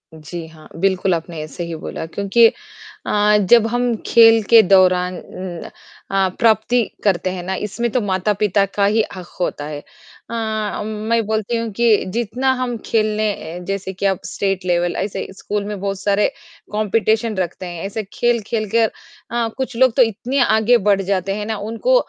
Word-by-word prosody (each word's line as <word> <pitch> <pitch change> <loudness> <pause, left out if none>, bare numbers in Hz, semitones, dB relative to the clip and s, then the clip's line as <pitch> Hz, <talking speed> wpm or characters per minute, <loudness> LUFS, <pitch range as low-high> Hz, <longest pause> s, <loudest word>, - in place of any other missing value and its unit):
जी 160 +2 -7
हाँ। 160 -1 -15
बिल्कुल 190 +1 +1
आपने 165 -2 -4
सही 170 +3 -6
बोला 160 - -6
क्योंकि 200 +7 +4 0.6
अ, 210 0 +3
जब 230 -2 +6
हम 245 +1 0
खेल 225 -1 +6
के 230 -1 +9
दौरान 185 -1 +3 0.9
अ, 195 -1 +2
प्राप्ति 230 +1 +3 0.2
करते 185 -2 +1
हैं 180 -1 -5
ना, 190 +1 -2
इसमें 225 +4 -2
तो 250 - +1
माता-पिता 200 +1 +1
का 200 +1 0
ही 215 +2 +3
हक़ 180 -2 -9
होता 145 -4 -2
है 150 -1 -5 0.5
अ, 220 -2 -2
मैं 220 +2 -1
बोलती 220 +2 -1
हूँ 230 0 -2
कि 230 -1 +3
जितना 240 +3 0
हम 245 -2 -2
खेलें, 210 -5 -1
जैसे 195 -1 -3
कि 190 - -4
अब 195 -2 +1
स्टेट 195 -2 -2
लेवल 175 -1 +1
ऐसे 195 0 -3
स्कूल 205 0 -3
में 205 -2 -5
बहुत 195 -1 -3
सारे 200 +1 +2 0.4
कॉम्पिटिशन 215 +1 +1
रखते 185 0 -3
हैं। 175 -2 -6
ऐसे 215 +2 -4
खेल-खेल 230 -2 0
के 230 +3 +3
अ, - - -3 0.7
कुछ 260 -1 -3
लोग 255 -2 +4
तो 265 - +4
इतने 240 +5 -2
आगे 220 +2 +4
बढ़ 195 -1 +3
जाते 195 0 -1
हैं 210 0 -4
ना 220 -1 -3
उनको - - +1
205 Hz, 165 wpm, -19 LUFS, 185-225 Hz, 0.9 s, के